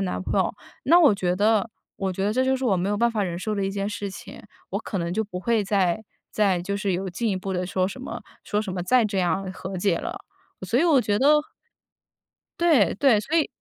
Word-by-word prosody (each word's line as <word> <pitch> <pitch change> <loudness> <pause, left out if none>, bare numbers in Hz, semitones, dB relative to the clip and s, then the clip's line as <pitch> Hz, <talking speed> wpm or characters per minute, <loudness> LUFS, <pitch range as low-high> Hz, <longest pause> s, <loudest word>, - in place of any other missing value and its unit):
男 90 -1 -2
朋 - - 0
友， - - +1 0.3
那 335 +5 +6
我 305 -11 +6
觉 180 -2 -1
得 215 +1 +2 0.3
我 195 -1 -2
觉 190 +1 -2
得 205 - +1
这 255 +3 +2
就 265 0 +2
是 265 - -4
我 220 -6 +3
没 185 +1 -1
有 205 - 0
办 235 +3 +2
法 215 - 0
忍 175 -3 -3
受 215 +4 -2
的 200 - -1
一 - - -2
件 200 0 -3
事 205 -1 -4
情， - - -10 0.3
我 - - -1
可 205 - -5
能 170 -1 -2
就 220 - 0
不 200 -4 -7
会 225 +3 +1
再 195 -1 +1 0.3
再 200 -4 +2
就 200 +2 -3
是 200 -1 -1
有 185 +2 -2
进 225 +6 -2
一 195 - 0
步 190 +1 -4
地 180 0 -2
说 185 0 0
什 200 +7 -7
么 260 - -7 0.2
说 210 +1 -1
什 195 - -5
么 180 -1 -3
再 245 +6 +3
这 200 -2 -1
样 190 +1 0
和 190 +1 -6
解 180 -1 +1
了。 - - -5 0.5
所 230 +7 +1
以 - - +3
我 320 -5 +5
觉 205 -4 +1
得 300 +3 +4 1.2
对 305 - +4
对， 255 -2 +4
所 295 +9 -2
以 315 - +3
200 Hz, 270 characters per minute, -24 LUFS, 185-230 Hz, 1.2 s, 那